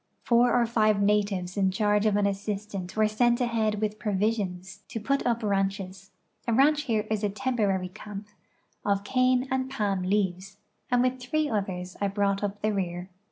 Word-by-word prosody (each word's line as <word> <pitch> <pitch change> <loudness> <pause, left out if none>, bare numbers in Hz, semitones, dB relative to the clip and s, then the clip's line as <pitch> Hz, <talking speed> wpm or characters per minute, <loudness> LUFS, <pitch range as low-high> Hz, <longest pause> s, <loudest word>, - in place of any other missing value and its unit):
Four 245 +1 +4
or 235 - +3
five 215 -3 +2
natives 200 -3 +1
in 195 -2 +2
charge 210 +2 +2
of 210 - +2
an 205 0 +2
assistant 200 -1 -3
were 215 0 +4
sent 235 +3 +2
ahead 225 -4 0
with 215 0 -2
provisions, 195 -3 -2
to 225 - -5
put 275 +6 0
up 235 -1 0
ranches 195 -1 -2 0.4
(a 230 - +2
ranch 295 +3 +4
here 220 -4 0
is 215 -1 0
a 205 - +2
temporary 205 -5 0
camp) 205 +2 -9 0.6
of 200 -1 +1
cane 255 +3 +2
and 260 0 0
palm 205 -7 -1
leaves, 190 0 -1 0.3
and 245 0 +3
with 255 0 0
three 305 +5 0
others 185 -5 -3
I 200 - +2
brought 200 0 0
up 205 0 -3
the 215 0 +1
rear. 180 -1 -3
210 Hz, 175 wpm, -27 LUFS, 195-235 Hz, 0.6 s, Four